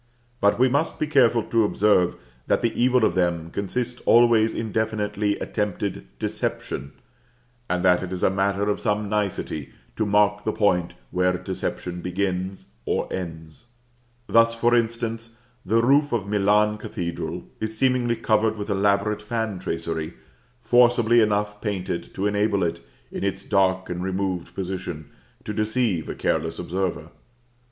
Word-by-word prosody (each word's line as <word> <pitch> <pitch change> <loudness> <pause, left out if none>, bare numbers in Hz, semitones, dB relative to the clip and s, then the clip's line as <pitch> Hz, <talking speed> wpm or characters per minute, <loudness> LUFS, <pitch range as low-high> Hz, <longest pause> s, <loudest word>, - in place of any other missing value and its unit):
But 100 0 +3
we 130 +2 +5
must 145 +5 0
be - - 0
careful 125 -6 +3
to 115 +1 +2
observe, 100 -3 +3 0.3
that - - +1
the 115 - +1
evil 125 -1 +3
of 85 - +1
them 85 -2 0
consists 120 +5 -3
always 115 -2 +5
in 110 -1 -4
definitely 105 -1 -1
attempted 105 -1 -3
deception, 70 +2 -4 0.8
and 90 0 0
that 90 -1 +5
it 95 - -5
is 90 - -4
a - - +4
matter 100 +1 0
of 105 - 0
some 105 0 -1
nicety 90 - -2 0.2
to 110 - 0
mark 105 0 +3
the 110 - 0
point 90 -5 +1 0.2
where 90 0 +1
deception 90 0 -4
begins 95 +1 -2 0.2
or - - -2
ends. 80 +2 -7 0.6
Thus, 115 0 +4
for 120 +1 +2
instance, 115 -1 -1 0.3
the 115 +4 +2
roof 145 +3 +4
of 115 -5 0
Milan 105 +1 +2
Cathedral 85 -1 -4 0.2
is 110 0 -4
seemingly 125 -2 +2
covered 110 -1 +1
with 105 0 -4
elaborate 100 +1 +1
fan 110 -3 -3
tracery, 80 -1 -4 0.5
forcibly 120 0 +5
enough 105 -1 0
painted 95 -5 -3
to 95 - -2
enable 105 -1 +1
it, 85 0 -1 0.3
in - - -5
its 95 0 -2
dark 95 -2 +1
and 90 0 -4
removed 95 -2 -3
position, 90 -5 -5 0.3
to 105 - -4
deceive 110 -5 0
a - - -4
careless 80 +1 -1
observer. 90 -2 -3
105 Hz, 145 wpm, -24 LUFS, 90-110 Hz, 0.8 s, we